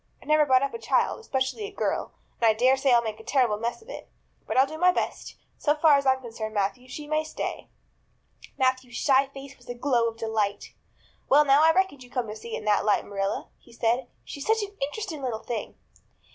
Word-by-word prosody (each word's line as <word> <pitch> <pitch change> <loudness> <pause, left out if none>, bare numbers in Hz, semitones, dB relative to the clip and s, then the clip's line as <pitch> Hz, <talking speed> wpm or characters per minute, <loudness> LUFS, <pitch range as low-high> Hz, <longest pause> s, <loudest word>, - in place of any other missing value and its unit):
I've - - -18
never 305 -1 +4
brought 260 0 +4
up 275 - -2
a 465 - -5
child, - - +1
especially 270 0 -2
a 415 - -7
girl, 405 - -2 0.3
and - - +3
I - - +5
dare 255 +4 +4
say 270 0 +1
I'll 235 -1 +5
make 220 -1 -5
a - - -11
terrible 240 -3 +1
mess 235 - -3
of - - -23
it. - - -9 0.4
But - - -2
I'll 265 - +6
do 315 +3 -8
my 360 +1 +5
best. - - -4 0.2
So 295 0 +2
far 305 -1 +5
as 280 -1 +1
I'm 260 0 +3
concerned, 225 -3 -6
Matthew, 210 +6 -1
she 300 +3 -7
may 310 +1 0
stay." 315 - -5 0.9
Matthew's 255 -2 0
shy 270 0 +3
face 275 0 -11
was 245 - -19
a 245 - -4
glow 240 -2 +1
of 225 0 -5
delight. 215 -3 -2 0.6
"Well 295 +2 +6
now, 275 +1 +5
I 325 - +7
reckoned 370 -6 0
you'd 245 - -17
come 250 -2 -1
to 210 - -6
see 225 +1 -7
it - - -2
in 215 - -9
that 210 -1 +3
light, 210 -1 +2
Marilla," 195 -1 -3
he 240 - -20
said. 235 +2 0 0.2
"She's 285 - -7
such 445 -1 +2
an 405 0 -8
interesting 325 -2 -6
little 235 -4 -3
thing." 230 -3 -5
260 Hz, 230 wpm, -26 LUFS, 230-295 Hz, 0.9 s, I